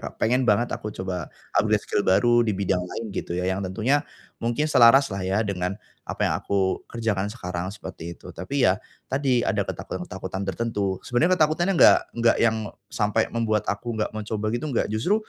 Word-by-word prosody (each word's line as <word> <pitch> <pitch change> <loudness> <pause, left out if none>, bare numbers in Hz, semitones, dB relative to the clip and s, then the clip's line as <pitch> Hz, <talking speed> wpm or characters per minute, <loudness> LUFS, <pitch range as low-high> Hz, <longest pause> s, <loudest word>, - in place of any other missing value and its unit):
Kak, - - -7
pengen 125 +4 +2
banget 120 0 +2
aku 105 - -6
coba 95 -4 -5 0.2
upgrade 105 0 +3
skill - - 0
baru 120 +5 +4
di 115 - 0
bidang 95 -2 0
lain 100 +3 -6
gitu - - -4
ya 90 - -1
yang 95 +1 -1
tentunya 115 +10 +1 0.4
mungkin 120 +6 0
selaras 135 -1 +6
lah 100 - -3
ya 95 +2 0
dengan 95 0 -2 0.2
apa - - -2
yang - - 0
aku 95 -1 0
kerjakan 105 -4 -1
sekarang 90 -5 -4
seperti 85 -4 -8
itu. - - -11
Tapi 125 +10 0
ya, 95 +3 +1 0.2
tadi 130 -3 +1
ada - - +1
ketakutan-ketakutan 95 +1 -5
tertentu. 100 -1 -2
Sebenarnya 170 +10 +2
ketakutannya 160 +5 +2
enggak - - +8 0.2
enggak 115 0 +3
yang 110 -1 +3 0.3
sampai 105 +1 0
membuat 110 -3 0
aku 115 +3 -3
enggak 110 -1 -1
mencoba 110 0 -4
gitu 120 +5 -2
enggak, 135 -6 0
justru 110 - +1
110 Hz, 180 wpm, -25 LUFS, 95-120 Hz, 0.4 s, enggak